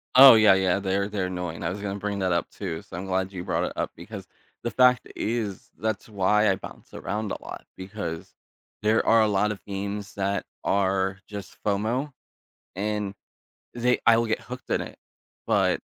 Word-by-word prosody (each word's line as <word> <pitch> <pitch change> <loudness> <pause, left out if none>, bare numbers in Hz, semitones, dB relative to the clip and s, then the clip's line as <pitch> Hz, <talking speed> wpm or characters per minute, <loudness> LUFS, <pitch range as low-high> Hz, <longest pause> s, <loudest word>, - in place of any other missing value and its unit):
Oh, 130 -2 +11
yeah, 110 -3 +7
yeah, 95 0 +2
they're 100 0 0
they're 100 -3 -1
annoying. 90 -2 -4
I - - 0
was 100 +3 -5
gonna 100 0 -3
bring 100 0 -2
that 95 -2 +1
up 85 - 0
too, 85 -5 -5
so - - -10
I'm 95 - -5
glad 95 0 -1
you 90 -2 -6
brought - - 0
it - - -4
up - - -2
because - - -9 0.4
the 120 - -2
fact 125 0 +4
i - - -13
is 110 -4 -3
that's 110 0 -3
why 105 +1 +3
I 95 - +3
bounce - - -11
around 105 0 -3
a - - -4
lot, - - -8
because 95 -4 -6 0.5
there 110 +1 +3
are 115 0 +6
a 110 - +4
lot 105 +1 +2
of 100 - -7
games 100 +1 -4
that 100 0 -1 0.2
are, 95 0 +1
just, 100 -3 -8
FOMO, 110 +8 0 0.6
and 105 0 -2 0.6
they 120 +1 +2
I 115 -1 +7
will 115 - +2
get 110 - 0
hooked 125 +1 -9
in - - +1
it, - - -8 0.5
but - - +3
100 Hz, 195 wpm, -26 LUFS, 95-110 Hz, 0.6 s, Oh